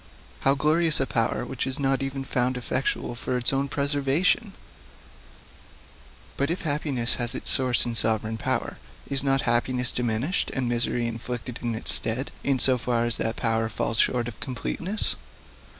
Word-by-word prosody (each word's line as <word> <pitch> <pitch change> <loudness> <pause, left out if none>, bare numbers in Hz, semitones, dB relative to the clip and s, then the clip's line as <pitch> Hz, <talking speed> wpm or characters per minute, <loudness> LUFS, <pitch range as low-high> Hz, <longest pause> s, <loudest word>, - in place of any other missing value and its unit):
How 135 +1 +3
glorious 155 +2 +2
a 135 - +1
power, 115 -1 -1
which 130 +1 -4
is 135 +2 +3
not 135 0 0
even 135 0 -4
found 125 -1 -1
effectual 125 0 -2
for 125 +1 -3
its 125 +2 +4
own 135 +1 0
preservation! 145 - 0 1.8
But 140 +2 0
if 170 - -3
happiness 145 -6 0
has 120 +1 0
its - - +2
source 130 -2 +5
in 120 - -3
sovereign 110 0 +2
power, - - -3 0.3
is 135 -1 +3
not 135 -1 +1
happiness 125 +1 +1
diminished, 125 - -1
and 130 -3 -1
misery 120 0 0
inflicted 120 +1 -6
in 120 -2 -2
its 110 - +4
stead, 120 +5 0
in 140 -1 +1
so 130 0 +4
far 120 0 -1
as 120 -2 +5
that 115 - -2
power 115 -1 -1
falls 110 +1 -2
short 120 -2 +2
of 120 - -9
completeness? 170 +10 -2
125 Hz, 165 wpm, -25 LUFS, 120-140 Hz, 1.8 s, source